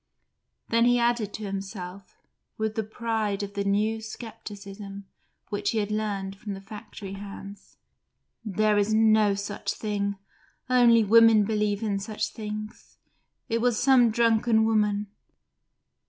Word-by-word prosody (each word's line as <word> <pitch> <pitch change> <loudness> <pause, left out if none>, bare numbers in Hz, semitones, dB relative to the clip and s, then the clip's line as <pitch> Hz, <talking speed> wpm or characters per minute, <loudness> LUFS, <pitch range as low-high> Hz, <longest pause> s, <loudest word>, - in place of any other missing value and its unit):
Then 230 0 +3
he 245 0 +4
added 235 -3 +1
to 215 - -7
himself, 195 -1 -7 0.4
with 220 0 -1
the 220 - -1
pride 215 -2 -2
of 200 0 -6
the 200 0 -2
new 210 +3 +1
scepticism 205 -3 -9 0.6
he 220 - 0
had 210 -1 -1
learnt 200 -2 -2
from 205 -1 -6
the - - -8
factory 205 -1 -9
hands: 200 0 -10 0.7
"There 215 0 +2
is 210 +1 +1
no 215 -2 +4
such 200 +1 -4
thing; 200 -2 -2 0.5
only 235 -2 +6
women 225 0 +6
believe 210 0 0
in 205 -2 0
such 215 +1 -3
things. 215 -1 -8 0.5
It 230 0 0
was 245 -2 +2
some 250 -2 +5
drunken 225 0 +3
woman." 210 -2 +1
215 Hz, 130 wpm, -26 LUFS, 200-225 Hz, 0.7 s, only